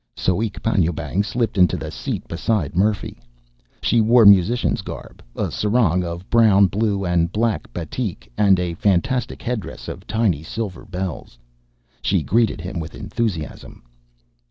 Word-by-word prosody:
Soek 100 +3 -1
Panjoebang 85 -4 0
slipped 110 -1 -1
into 90 - +4
the - - -6
seat - - -5
beside 85 -2 -1
Murphy. 100 +3 0 0.6
She 115 - +3
wore 115 +1 +5
musician's 100 +4 +4
garb: - - -9
a - - -2
sarong 105 -5 +1
of 85 +2 -6
brown, 110 -4 +6
blue, 100 0 0
and 85 -1 +1
black 110 - -1
batik, 90 - -5
and 100 -3 +4
a 90 -1 -2
fantastic 100 +7 0
headdress 110 -9 -4
of - - -8
tiny 110 -9 +1
silver 100 +3 -5
bells. 90 - -5 0.6
She - - +1
greeted 115 -6 +1
him 90 +1 -5
with 80 0 -7
enthusiasm. 100 -10 -4
100 Hz, 135 wpm, -21 LUFS, 85-110 Hz, 0.6 s, brown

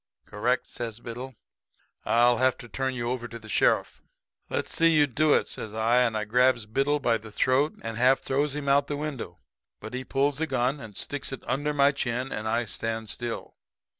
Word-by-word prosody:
"'Correct,' 115 +4 -1
says 115 -2 -6
Biddle. 125 +2 -7 0.7
'I'll 120 0 +4
have 130 0 +3
to 120 - -10
turn 130 +2 -2
you 120 -1 -2
over 120 -2 -3
to 115 - -8
the 110 -1 -13
sheriff.' 110 - +1 0.5
"'Let's - - -2
see 165 0 +5
you 145 - +6
do 145 +3 +3
it,' - - +1
says 110 0 -6
I, 115 +2 +2
and 120 -3 +3
I 105 - -2
grabs 125 +1 +3
Biddle 135 +7 +1
by 115 -4 +1
the 110 0 -11
throat 130 +7 +2
and 115 -1 -4
half 130 +3 +4
throws 140 +1 0
him 145 -1 -4
out 140 +1 +4
the 145 - -3
window, 140 - -5 0.4
but 110 +2 -9
he 130 +1 -3
pulls 140 +2 0
a 160 - +1
gun 130 +1 0
and 110 -6 -9
sticks 145 -1 -4
it 135 - -6
under 145 +2 0
my 140 -1 +4
chin, 130 -1 -2
and 110 +1 -3
I 115 +2 +1
stand 115 0 -4
still. 120 +1 -5
125 Hz, 205 wpm, -27 LUFS, 115-140 Hz, 0.7 s, you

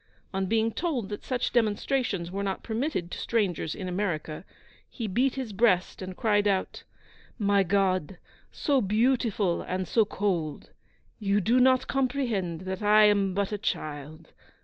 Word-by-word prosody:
On 190 0 -1
being 225 +2 +1
told 265 - -2
that 205 - -6
such 250 -2 -1
demonstrations 215 -4 0
were 195 +1 -3
not 195 -1 -3
permitted 225 - -2
to - - -5
strangers 190 -8 -1
in 185 - -5
America, 175 -4 -3 0.5
he 235 - -5
beat 245 +7 +1
his 255 -6 -4
breast 195 -4 +2
and 185 -1 -7
cried 205 -2 +2
out, 195 -2 -1 0.5
'My 200 -3 +3
God, 185 -2 +1 0.3
so 280 -4 +1
beautiful 215 -3 +1
and 185 0 -3
so 225 +7 +3
cold! 180 -7 -2 0.5
You 200 -1 +1
do 230 +6 +3
not 255 0 +4
comprehend 240 - -1
that 190 +1 -5
I 210 +1 +6
am 200 -3 +3
but 200 0 0
a 210 - -3
child. 155 -3 -5
200 Hz, 150 wpm, -27 LUFS, 185-230 Hz, 0.5 s, I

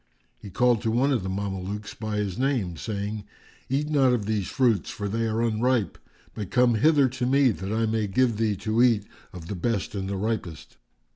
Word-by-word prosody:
He 100 - -10
called 120 +3 +2
to 115 - -1
one 125 +5 +2
of 130 - +1
the 95 - -4
Mamelukes 100 +1 -4
by 110 -1 -4
his 100 -1 -2
name, 125 -10 0
saying, 105 +3 -4 0.5
"Eat 140 +3 0
not 135 -4 +3
of 110 -4 -1
these 105 -3 -1
fruits, 120 - +1
for 100 -2 -4
they 115 +3 -1
are 110 +1 0
unripe; 115 0 0 0.3
but 105 -4 -6
come 125 -1 +4
hither 140 +4 +4
to 125 0 -2
me, 135 -1 +4
that 95 -1 -5
I 110 +1 +1
may 110 -1 0
give 115 +3 +1
thee 110 -2 +1
to 110 +4 0
eat 115 -5 +4 0.3
of 90 -3 -9
the - - -4
best 100 +2 -2
and 95 -2 -3
the 100 - -2
ripest." 95 - -4
110 Hz, 205 wpm, -26 LUFS, 100-125 Hz, 0.5 s, come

